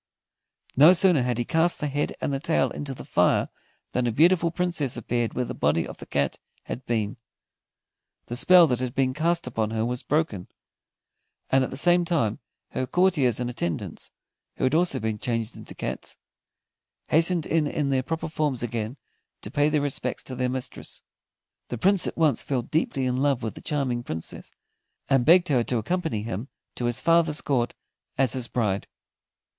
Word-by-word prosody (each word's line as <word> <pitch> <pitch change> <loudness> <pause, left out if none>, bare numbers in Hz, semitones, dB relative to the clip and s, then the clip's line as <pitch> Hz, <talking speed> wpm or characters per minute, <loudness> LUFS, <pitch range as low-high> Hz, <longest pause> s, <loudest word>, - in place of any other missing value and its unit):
No 150 +7 +8
sooner 180 -5 +4
had 125 -1 -1
he 120 - -1
cast 165 +5 +1
the - - -2
head 145 0 -2
and 140 - -2
the 135 - -1
tail 160 +3 +1
into 140 -2 -5
the - - -10
fire - - +2 0.4
than 125 -1 0
a - - +1
beautiful 170 +6 +4
Princess 165 -7 -1
appeared 120 0 -2
where 125 - 0
the - - -5
body - - +1
of - - -9
the - - -11
cat 70 -1 -1 0.2
had 125 - -6
been. 110 -1 -1 1.1
The 120 - -5
spell 180 +7 +7
that 125 -6 0
had 125 0 -3
been 130 -1 +1
cast 165 +4 +1
upon 115 -3 -1
her 110 0 -1
was 125 +1 -3
broken, 145 - -1 1.0
and 135 0 +4
at - - -2
the 130 - -6
same 175 +3 +4
time 160 - 0 0.3
her 130 - -2
courtiers 155 - +2
and 125 - -2
attendants, 85 -9 -4 0.5
who - - -5
had 130 +2 +2
also 170 +2 +2
been 110 -1 -2
changed 115 0 -2
into - - -10
cats, - - -5 0.9
hastened 165 +1 +3
in 160 -2 +1
in 145 -1 -1
their 130 -1 +2
proper 160 +5 -3
forms 150 -6 -1
again, 115 +1 -3 0.4
to - - -7
pay 145 0 +2
their 150 -1 +1
respects 130 -3 -3
to 130 - -7
their 125 0 0
mistress. 130 -1 -6 0.6
The 120 - -4
Prince 195 - +3
at - - -5
once 160 -4 +3
fell 130 -4 -1
deeply 135 -1 -1
in 125 0 0
love 135 -3 +1
with 110 - -3
the - - -11
charming 135 -5 -1
Princess, 80 -8 -7 0.6
and 135 -3 +4
begged 175 +1 +6
her 125 -5 +3
to 125 - -1
accompany 160 - -2
him 115 +2 -4 0.3
to 120 - -4
his 120 +1 0
father's 165 -1 +3
court 125 -4 0 0.4
as 130 -3 +2
his 130 -3 -2
bride. 105 -6 -1
130 Hz, 185 wpm, -25 LUFS, 120-160 Hz, 1.1 s, No